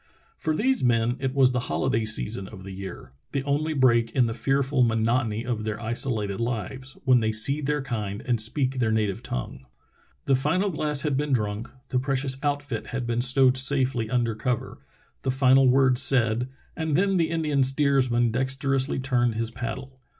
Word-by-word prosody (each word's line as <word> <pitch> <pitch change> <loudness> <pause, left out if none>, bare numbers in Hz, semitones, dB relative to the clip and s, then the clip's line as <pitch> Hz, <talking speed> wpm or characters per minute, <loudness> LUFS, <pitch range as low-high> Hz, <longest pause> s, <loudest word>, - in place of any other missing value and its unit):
For 155 - -1
these 260 +8 0
men 120 -1 +2
it 135 0 -3
was 130 -2 +5
the 125 - -1
hoHday 115 -4 0
season 105 -2 +2
of 95 -3 -11
the 95 - -9
year, 95 -8 -9 0.2
the 135 - -1
only 150 +3 -1
break 120 -4 +3
in 125 - +4
the 115 - -2
fearful 135 +3 0
monotony 115 0 0
of 120 -3 -3
their 105 -1 -4
isolated 110 -3 -2
lives, 125 +3 -4
when 130 -2 +5
they 110 -1 0
see 125 +8 +4
their 150 0 -1
kind 105 -5 -4
and 120 -3 +1
speak 130 +3 0
their 115 -3 +1
native 105 -3 -1
tongue. 65 +1 -6 0.6
The 135 - +3
final 165 +9 0
glass 150 -3 +1
had 145 -3 -1
been 145 -1 -1
drunk, 105 0 -2 0.2
the 125 - 0
precious 135 0 0
outfit* 145 -5 -3
had 130 -1 -4
been 120 0 -1
stowed 130 0 +3
safely 130 -4 +2
under 120 -2 0
cover, 120 +2 -3 0.4
the 135 - -2
final 130 0 +4
word 130 -1 +3
said, 125 -2 +2 0.3
and 160 -2 -2
then 195 +3 +2
the 165 -2 +1
Indian 155 -4 0
steersman 130 -3 +2
dexterously 135 +2 0
turned 125 -3 0
his 115 0 -2
paddle. 130 +3 -7
130 Hz, 180 wpm, -25 LUFS, 115-135 Hz, 0.6 s, was